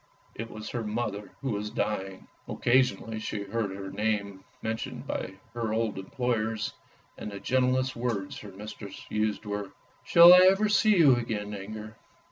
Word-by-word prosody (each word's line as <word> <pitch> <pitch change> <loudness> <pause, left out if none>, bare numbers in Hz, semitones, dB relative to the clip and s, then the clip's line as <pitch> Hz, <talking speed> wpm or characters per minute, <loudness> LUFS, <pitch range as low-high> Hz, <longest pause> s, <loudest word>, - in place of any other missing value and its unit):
It 115 +1 -6
was 110 -1 -7
her 120 -2 -3
mother 105 -1 -3
who 135 -2 -2
was 105 0 -3
dying. 95 -3 -3 0.2
Occasionally 120 -3 +1
she 105 -1 -4
heard 105 +1 -2
her 95 0 -7
name 105 -3 -2 0.2
mentioned 110 0 -4
by 95 - -4 0.2
her 115 -2 -2
old 110 -3 -1
employers, 110 +1 -2 0.5
and - - -5
the 100 - -7
gentlest 130 +1 +1
words 115 -5 -3
her 105 - -10
mistress 100 0 -9
used 105 0 -1
were, 105 -1 -4 0.2
" - - -34
shall 170 +1 +9
I 180 - +9
ever 205 +2 +2
see 210 -1 +4
you 145 -7 +7
again, 105 -3 -3
Inger? 110 +2 -7
110 Hz, 160 wpm, -28 LUFS, 100-120 Hz, 0.5 s, shall